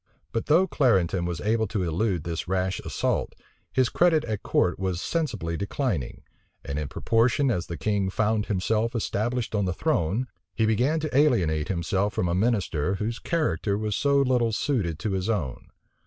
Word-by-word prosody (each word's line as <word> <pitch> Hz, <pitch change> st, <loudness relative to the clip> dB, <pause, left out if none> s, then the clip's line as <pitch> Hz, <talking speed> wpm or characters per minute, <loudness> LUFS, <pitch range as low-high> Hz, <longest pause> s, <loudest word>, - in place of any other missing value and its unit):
But 115 Hz, -, -2 dB
though 165 Hz, +5 st, +5 dB
Clarendon 95 Hz, -, +2 dB
was 85 Hz, -2 st, -3 dB
able 110 Hz, +1 st, +1 dB
to 100 Hz, -2 st, -2 dB
elude 90 Hz, +1 st, 0 dB
this 85 Hz, 0 st, -4 dB
rash 95 Hz, 0 st, 0 dB
assault, -, -, -2 dB, 0.4 s
his 130 Hz, -1 st, +3 dB
credit 170 Hz, -3 st, +3 dB
at 110 Hz, -3 st, -3 dB
court 90 Hz, -, +1 dB
was 95 Hz, -2 st, -1 dB
sensibly 115 Hz, -, -2 dB
declining; 100 Hz, -, -2 dB, 0.4 s
and 70 Hz, +2 st, -3 dB
in 75 Hz, -, -3 dB
proportion 120 Hz, -, +2 dB
as 90 Hz, -6 st, -2 dB
the 85 Hz, -, -5 dB
king 100 Hz, -3 st, 0 dB
found 110 Hz, +2 st, 0 dB
himself 110 Hz, +4 st, 0 dB
established 115 Hz, +2 st, -1 dB
on 100 Hz, -2 st, +1 dB
the 90 Hz, -, -1 dB
throne, 95 Hz, +13 st, 0 dB, 0.3 s
he 110 Hz, -, +2 dB
began 125 Hz, +9 st, +2 dB
to 155 Hz, -4 st, -3 dB
alienate 90 Hz, -, +3 dB
himself 95 Hz, +3 st, -1 dB
from 90 Hz, -, 0 dB
a -, -, 0 dB
minister 95 Hz, -5 st, +1 dB
whose 110 Hz, +4 st, -3 dB
character 110 Hz, -, 0 dB
was 105 Hz, -1 st, -2 dB
so 140 Hz, -1 st, +2 dB
little 125 Hz, -3 st, +2 dB
suited 105 Hz, -, -1 dB
to 105 Hz, +4 st, -3 dB
his 95 Hz, +2 st, -1 dB
own. 80 Hz, -, -2 dB
105 Hz, 170 wpm, -26 LUFS, 90-120 Hz, 0.4 s, though